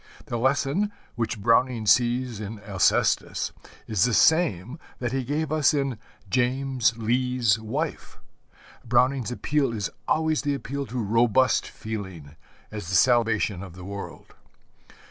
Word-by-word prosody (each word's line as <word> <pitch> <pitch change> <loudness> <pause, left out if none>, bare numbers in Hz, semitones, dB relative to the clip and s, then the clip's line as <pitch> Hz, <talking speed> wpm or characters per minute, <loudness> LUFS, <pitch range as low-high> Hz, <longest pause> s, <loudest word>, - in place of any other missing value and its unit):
The 120 - -3
lesson 140 - +1 0.2
which 115 -1 -3
Browning 115 +1 +2
sees 120 0 +2
in 105 0 -6
Alcestis 100 -3 +1 0.3
is 105 -5 +1
the 125 -3 +2
same 150 - +2 0.2
that 120 -2 -3
he 135 0 -1
gave 145 +4 -2
us 155 -1 +3
in 135 -5 -1 0.3
James 125 0 +1
Lee's 120 -1 +1
Wife. 140 +9 -4 0.7
Browning's 125 +1 +2
appeal 140 +2 0
is 105 -3 -3 0.2
always 160 -1 +1
the 145 -1 -1
appeal 140 0 -5
to 125 - -6
robust 120 +3 +2
feeling 95 -9 -7 0.4
as 105 -5 -6
the 95 - 0
salvation 115 -3 +3
of 95 -3 -10
the 90 -1 -10
world. 100 +1 -8
120 Hz, 130 wpm, -25 LUFS, 110-135 Hz, 0.7 s, us